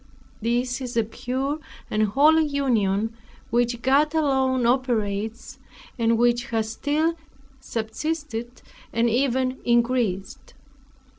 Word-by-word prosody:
This 245 +3 0
is 245 -2 -4
a 230 - +4
pure 260 +6 -3 0.3
and 215 - +1
holy 295 +10 +4
union, 225 -7 +1 0.4
which 240 0 +1
God 290 +4 +3
alone 265 -4 +2
operates, 225 -3 -1 0.4
and 230 0 +3
which 240 +1 +2
has 220 -3 -2
still 305 +7 0 0.5
subsisted, 240 +1 -4 0.3
and 230 +1 +2
even 255 +1 +1
increased. 235 -5 0
240 Hz, 100 wpm, -24 LUFS, 225-270 Hz, 0.5 s, a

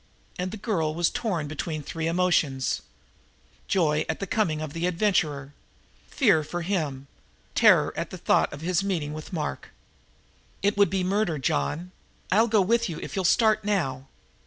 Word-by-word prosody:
And 180 +1 -1
the 220 - -7
girl 170 -8 -1
was 170 0 +2
torn 180 -10 -2
between 155 0 -4
three 160 +2 -3
emotions: 165 -6 +1 0.9
Joy 155 -5 +2
at 160 - -2
the 195 - -2
coming 180 -7 0
of 155 -2 -5
the 165 +2 -1
adventurer, 160 -7 0 0.5
fear 200 - +3
for 175 +3 -4
him, 155 -8 -2 0.5
terror - - +5
at - - -3
the - - -7
thought - - +2
of 145 - -8
his 175 +2 0
meeting 165 -7 -2
with 155 0 -8
Mark. 155 -5 -4 0.9
"It 205 +1 +2
would 200 0 +4
be 190 -1 0
murder, 190 -3 0
John! 140 - -1 0.4
I'll 220 +5 +4
go 215 -2 +3
with 230 +3 +2
you 165 - -5
if - - -7
you'll 190 -2 -1
start 220 +2 +4
now!" 140 -11 -1
175 Hz, 165 wpm, -26 LUFS, 155-200 Hz, 0.9 s, terror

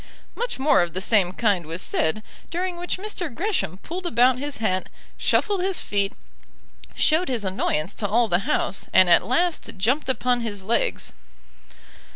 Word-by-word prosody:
Much 485 +1 -3
more 270 -3 +4
of 175 -1 -2
the - - 0
same 190 -2 +3
kind 190 -5 0
was 165 +2 -4
said, 170 +4 0 0.3
during 360 +1 -2
which 350 +1 -3
Mr. 375 -4 -4
Gresham 330 - -2
pulled 355 +2 -5
about 250 -1 +3
his 290 +1 -3
hat, 185 -4 -1 0.3
shuffled 405 -3 +1
his 380 0 0
feet, 200 -1 0 0.8
showed 325 +2 +3
his 235 -5 -1
annoyance 185 -2 -1
to 205 - -2
all 230 +3 +2
the 175 -3 +2
House, 195 - 0
and 185 -2 +6
at 170 - +6
last 335 - 0
jumped 255 +9 0
upon 250 -1 +1
his 205 -4 -5
legs. 225 +5 -1
235 Hz, 165 wpm, -24 LUFS, -, 0.8 s, and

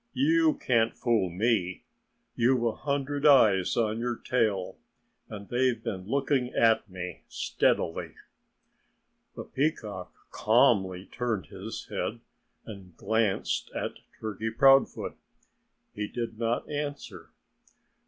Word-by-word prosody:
"You 315 +3 +3
can't 115 - +1
fool 115 -6 +1
me. 95 -1 0 0.5
You've 120 +1 +2
a 115 - +2
hundred 140 +2 -3
eyes 110 -11 +5
on 110 -1 +1
your 120 0 -1
tail. 110 -7 -1 0.5
And 100 -1 -8
they've 125 -2 0
been 95 -5 -5
looking 135 0 0
at 115 -2 +3
me 90 -1 -7
steadily." 80 - -1 1.2
The - - -6
peacock 105 - -3 0.2
calmly 100 -5 +2
turned 115 - -3
his - - -7
head - - -3 0.5
and 95 -5 -11
glanced 110 -3 0
at - - -4 0.2
Turkey 110 0 -3
Proudfoot. 135 +4 +3 0.8
He 105 0 -3
did 115 -1 -5
not 115 0 -1
answer. 145 -1 -5
115 Hz, 110 wpm, -28 LUFS, 100-130 Hz, 1.2 s, eyes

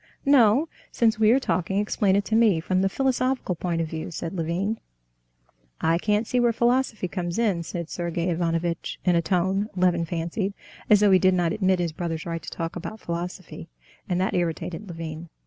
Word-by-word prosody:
"No; 270 +1 +5 0.2
since 225 -1 +2
we 215 -1 +5
are 250 +4 +5
talking, 180 -4 -1
explain 205 -1 +2
it 200 0 +1
to 220 - 0
me 220 -7 +4
from 185 +3 0
the 195 - +2
philosophical 260 -3 0
point 170 -1 -2
of 165 - -2
view," 160 +1 -5
said 165 0 -5
Levin. 185 +5 -2 1.0
"I 165 +1 +2
can't 210 +3 +1
see 250 - 0
where 240 -1 +4
philosophy 235 -3 +1
comes 175 -1 -3
in," 210 -7 +1
said 170 0 -5
Sergey 170 +1 -2
Ivanovitch, 170 0 -2
in 180 -2 +4
a 170 - +3
tone, 190 +4 0
Levin 180 -2 +2
fancied, 175 +5 -3 0.3
as 210 -1 +6
though 205 -1 +5
he 185 - +6
did 185 0 +4
not 175 -1 +1
admit 190 -3 +2
his 175 -2 -1
brother's 165 0 -4
right 165 -1 -4
to - - -7
talk 165 -1 -5
about 205 +5 -6
philosophy. 175 0 -6 0.4
And 180 -1 +1
that 190 - 0
irritated 175 +3 -2
Levin. 165 -1 -7
180 Hz, 190 wpm, -25 LUFS, 170-210 Hz, 1.0 s, as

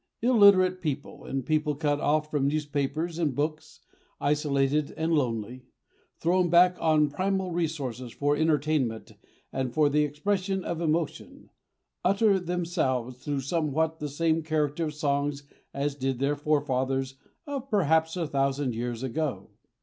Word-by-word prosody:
Illiterate 200 -6 +5
people, 145 -3 -4
and 135 -2 -3
people 155 -1 +1
cut 145 -1 0
off 150 +1 +1
from 140 -2 +1
newspapers 150 +3 -2
and 150 -6 0
books, 155 +1 -3 0.4
isolated 145 0 +1
and 160 +1 0
lonely, 125 -3 -2 0.5
thrown 175 +1 +2
back 180 +2 +6
on 155 -2 +4
primal 190 +2 -1
resources 140 -8 -3
for 145 +3 0
entertainment 150 -6 0 0.4
and 130 -2 -2
for 150 -2 +4
the 150 +1 +3
expression 190 +6 -1
of 170 -1 -3
emotion, 160 -1 -2 0.5
utter 200 -1 +3
themselves 165 -9 -2
through 145 -2 -2
somewhat 160 +2 -1
the 150 - -4
same 160 +3 +1
character 155 0 -1
of 150 -1 -5
songs 145 -1 -1 0.3
as 140 +1 -2
did 135 -2 -2
their 140 +3 +1
forefathers 135 -3 -1 0.3
of 275 -3 -5
perhaps 160 -4 +2
a 170 - -1
thousand 140 -2 0
years 120 +1 -4
ago. 130 -6 -3
150 Hz, 135 wpm, -27 LUFS, 140-165 Hz, 0.5 s, back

